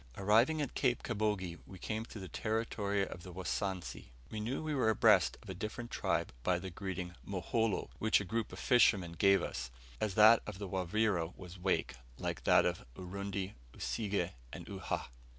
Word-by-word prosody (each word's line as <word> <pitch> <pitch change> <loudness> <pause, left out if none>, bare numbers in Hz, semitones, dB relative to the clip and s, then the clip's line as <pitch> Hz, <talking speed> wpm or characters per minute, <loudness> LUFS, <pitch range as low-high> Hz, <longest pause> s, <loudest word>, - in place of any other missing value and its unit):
Arriving 115 +10 +4
at 140 - -5
Cape 125 -3 +1
Kabogi, 100 -5 -1
we 95 - -10
came 110 +4 -3
to 115 - -10
the 95 - -6
territory 105 -2 -1
of 90 - -8
the 90 - -9
Wasansi. 95 +1 -3 0.3
We 110 - -3
knew 120 +8 -2
we 155 -1 -1
were 130 -6 +3
abreast 110 - +5
of - - -12
a - - -3
different 110 +5 -5
tribe - - 0
by 90 +8 +2
the 95 +1 -6
greeting 90 -1 -4
"Moholo," 100 +3 -1
which 110 - +4
a 105 - -4
group 115 +3 -2
of - - -8
fishermen 105 -8 +4
gave 100 +2 +4
us; 60 0 -4 0.3
as 105 -3 -1
that 110 +2 +8
of 105 -3 -5
the 100 0 -5
Wavira 95 -1 0
was 90 0 -10
"Wake," 95 +1 +1 0.2
like - - -4
that - - +6
of - - -1
Urundi, 100 +2 -4 0.2
Usige, 100 -5 -1 0.2
and - - -7
Uhha. - - -3
100 Hz, 180 wpm, -34 LUFS, 90-110 Hz, 0.3 s, that